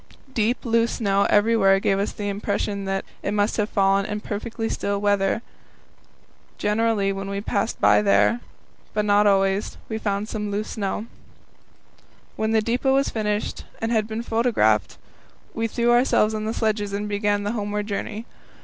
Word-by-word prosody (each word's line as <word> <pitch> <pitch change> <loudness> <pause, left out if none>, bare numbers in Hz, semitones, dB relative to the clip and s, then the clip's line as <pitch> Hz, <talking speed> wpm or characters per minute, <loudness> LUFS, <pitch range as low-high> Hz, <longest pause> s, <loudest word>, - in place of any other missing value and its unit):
Deep, 230 +2 0
loose 230 0 +2
snow 200 -2 +1
every 220 +3 +4
where 195 -3 +4
gave 195 0 +1
us 200 - -1
the 205 - -5
impression 200 0 -2
that 195 0 -2 0.2
it 205 - -2
must 205 +1 +1
have 210 -1 0
fallen 195 0 +2
in 210 +1 -3
perfectly 225 +2 -4
still 200 -2 -2
weather. 205 +2 +1 1.1
Generally 210 -2 +1
when 195 0 -5
we 200 0 -2
passed 205 +1 -2
by - - +5
here 210 +3 +3 0.6
but 210 0 +1
not 205 0 +4
always 195 0 +1
we 220 -1 -3
found 200 -1 -1
this - - -9
loose 210 -1 -3
snow. 205 +1 -3 1.3
When 220 - -1
the 220 0 +3
depot 250 +4 +1
was 275 0 +2
finished 210 -1 -2 0.2
and 225 +1 -2
had 220 -2 +1
been 220 +1 -4
photographed, 225 - +1 0.6
we 225 0 -1
threw 235 +1 +1
ourselves 240 -3 +3
on 215 0 -3
the 220 - -1
sledges 210 -2 -1
and 205 +1 -2
began 205 0 0
the 205 - -1
homeward 210 -2 -2
journey. 210 +2 -4
210 Hz, 165 wpm, -23 LUFS, 200-225 Hz, 1.3 s, by